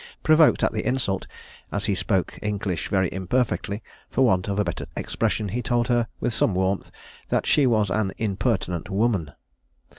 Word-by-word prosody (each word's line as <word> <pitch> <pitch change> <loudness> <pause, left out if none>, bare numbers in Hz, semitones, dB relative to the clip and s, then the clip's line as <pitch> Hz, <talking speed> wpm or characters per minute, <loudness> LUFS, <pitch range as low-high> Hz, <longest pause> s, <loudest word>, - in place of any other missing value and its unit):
Provoked 155 0 +5
at - - +2
the - - -2
insult, 120 -7 -1 0.4
as 100 +1 -1
he 105 - +1
spoke 95 -1 -1
English 100 -5 -2
very 95 -2 +2
imperfectly, 100 +2 -1 0.3
for 130 - +3
want 95 -4 +2
of 100 0 -1
a - - +4
better 85 -3 -4
expression, 105 -2 -1
he 120 +6 -2
told 120 +1 0
her, 120 -2 +2
with 120 - -1
some 100 - +2
warmth, 95 +1 0 0.4
"that - - +1
she 145 -3 +4
was 110 -5 +2
an 100 0 0
impertinent 100 -5 -1
woman." 100 - +1
105 Hz, 170 wpm, -24 LUFS, 95-120 Hz, 0.4 s, Provoked